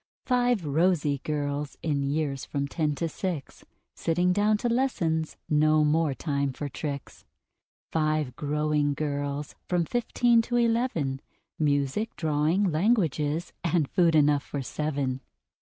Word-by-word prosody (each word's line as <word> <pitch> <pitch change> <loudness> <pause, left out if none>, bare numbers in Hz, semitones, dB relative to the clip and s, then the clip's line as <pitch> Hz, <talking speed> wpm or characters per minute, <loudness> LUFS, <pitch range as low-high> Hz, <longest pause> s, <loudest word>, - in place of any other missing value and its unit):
Five 245 -7 +2
rosy 150 -1 +2
girls, 145 0 -3
in 145 -3 0
years 140 -1 -1
from 140 -1 -2
Ten 150 0 -1
to 165 - -1
Six: 165 -3 -5 0.3
Sitting 175 +2 +1
down 210 +2 +3
to 240 - -2
lessons 175 -11 0
no 155 0 +4
more 150 -2 +2
time 140 -3 -1
for 145 - -4
tricks. 140 -1 -6 0.7
Five 155 -5 0
growing 150 0 0
girls, 145 -1 -3
from 175 -2 +1
Fifteen 240 +2 +2
to 240 +2 -3
Eleven: 230 - +1 0.4
Music, 145 +7 0
Drawing, 160 +5 +1
Languages, 160 - +1
and 170 -3 +1
food 170 0 +3
enough 145 -1 +4
for 140 -1 -5
seven! 135 -1 -2
155 Hz, 125 wpm, -27 LUFS, 145-180 Hz, 0.7 s, no